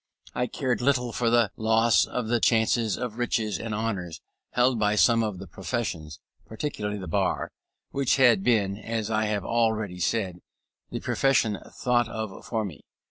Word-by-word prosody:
I 125 Hz, -, -1 dB
cared 125 Hz, 0 st, -1 dB
little 125 Hz, -2 st, +1 dB
for 115 Hz, 0 st, 0 dB
the 115 Hz, -2 st, +3 dB
loss 110 Hz, -3 st, +3 dB
of 125 Hz, -3 st, -3 dB
the 120 Hz, +1 st, +2 dB
chances 110 Hz, -1 st, +2 dB
of 125 Hz, -2 st, -5 dB
riches 110 Hz, -4 st, 0 dB
and 115 Hz, -, -5 dB
honours 100 Hz, -7 st, -3 dB, 0.3 s
held 125 Hz, 0 st, +2 dB
out -, -, -3 dB
by 105 Hz, 0 st, +2 dB
some 115 Hz, +2 st, +4 dB
of 105 Hz, -4 st, -2 dB
the 95 Hz, -, -8 dB
professions, 85 Hz, -4 st, -4 dB, 0.3 s
particularly 110 Hz, -4 st, -4 dB
the 95 Hz, -3 st, -7 dB
bar, 80 Hz, -, 0 dB, 0.4 s
which 135 Hz, -1 st, +2 dB
had 120 Hz, -7 st, +5 dB
been, 100 Hz, -5 st, +2 dB
as 110 Hz, -1 st, -3 dB
I 110 Hz, 0 st, +1 dB
have 105 Hz, -3 st, -2 dB
already 110 Hz, -5 st, 0 dB
said, 95 Hz, -3 st, -1 dB, 0.5 s
the -, -, -5 dB
profession 115 Hz, -7 st, +1 dB
thought 120 Hz, -2 st, +1 dB
of 110 Hz, -3 st, -6 dB
for 110 Hz, -2 st, -1 dB
me. 85 Hz, -7 st, -8 dB
110 Hz, 170 wpm, -26 LUFS, 100-120 Hz, 0.5 s, had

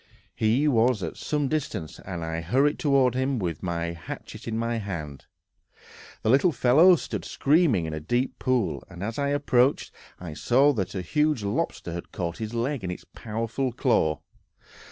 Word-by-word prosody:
He 115 Hz, +7 st, +2 dB
was 120 Hz, -5 st, +3 dB
at 80 Hz, -, -4 dB
some 150 Hz, -2 st, -1 dB
distance, 135 Hz, -, -3 dB
and 90 Hz, -3 st, -6 dB
I 80 Hz, 0 st, -3 dB
hurried 135 Hz, -, +2 dB
toward 135 Hz, -4 st, +3 dB
him 130 Hz, +1 st, 0 dB
with 85 Hz, -7 st, -3 dB
a 85 Hz, -1 st, -2 dB
hatchet 85 Hz, -, -9 dB
in 110 Hz, -1 st, -2 dB
my 115 Hz, 0 st, -1 dB
hand. 85 Hz, -10 st, -6 dB, 1.0 s
The -, -, +1 dB
little 140 Hz, +7 st, +4 dB
fellow 155 Hz, +8 st, +6 dB
stood -, -, -5 dB
screaming 140 Hz, -, +2 dB
in 80 Hz, -, -4 dB
a 75 Hz, -, -3 dB
deep 120 Hz, -, -1 dB
pool, 120 Hz, -, 0 dB
and 85 Hz, +2 st, -8 dB
as 110 Hz, +5 st, -3 dB
I 140 Hz, -, +1 dB
approached, 140 Hz, -2 st, +2 dB, 0.3 s
I 85 Hz, -4 st, -7 dB
saw 135 Hz, -, +3 dB
that 95 Hz, -4 st, -3 dB
a 95 Hz, -, -2 dB
huge 150 Hz, -, +1 dB
lobster 100 Hz, -3 st, -2 dB
had 85 Hz, -, -7 dB
caught 85 Hz, -2 st, -4 dB
his 110 Hz, +1 st, -4 dB
leg 125 Hz, +1 st, -1 dB
in 90 Hz, -, -3 dB
its 90 Hz, -, -6 dB
powerful 115 Hz, +4 st, -3 dB
claw. 80 Hz, -, +1 dB
115 Hz, 175 wpm, -26 LUFS, 90-135 Hz, 1.0 s, fellow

